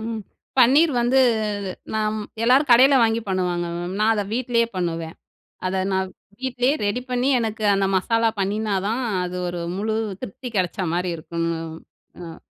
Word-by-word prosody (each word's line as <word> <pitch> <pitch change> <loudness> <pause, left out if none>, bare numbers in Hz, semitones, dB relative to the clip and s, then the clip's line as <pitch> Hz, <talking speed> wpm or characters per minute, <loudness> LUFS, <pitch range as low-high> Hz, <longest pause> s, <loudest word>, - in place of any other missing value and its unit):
ம். 225 0 -4 0.4
பன்னீர் 280 +6 +6
வந்து 240 +3 +2 0.8
நாம் 215 0 0 0.2
எல்லாரும் 260 +4 +4
கடையில 260 +4 +7
வாங்கி 225 0 +2
பண்ணுவாங்க 180 -2 -1
மேம். 175 +2 -4
நான் 220 +1 +4
அத 210 -2 0
வீட்லயே 235 -2 +1
பண்ணுவேன். 165 -2 -3 0.5
அத 185 - -1 0.2
நான் 190 0 0 0.3
வீட்லயே 255 +1 +1
ரெடி 220 +5 -1
பண்ணி 250 +1 0
எனக்கு 220 -1 -3
அந்த 195 0 +1
மசாலா 230 +4 +2
பண்ணினா 205 +1 0
தான் 230 +4 -1 0.2
அது 180 0 -4
ஒரு 175 0 -4 0.2
முழு 215 +3 -1 0.3
திருப்தி 245 +6 -7
கிடைச்ச 185 +2 -1
மாரி 180 0 -1
இருக்கும். 165 +1 -3 0.7
அம். 165 -1 -8
215 Hz, 150 wpm, -22 LUFS, 185-240 Hz, 0.8 s, கடையில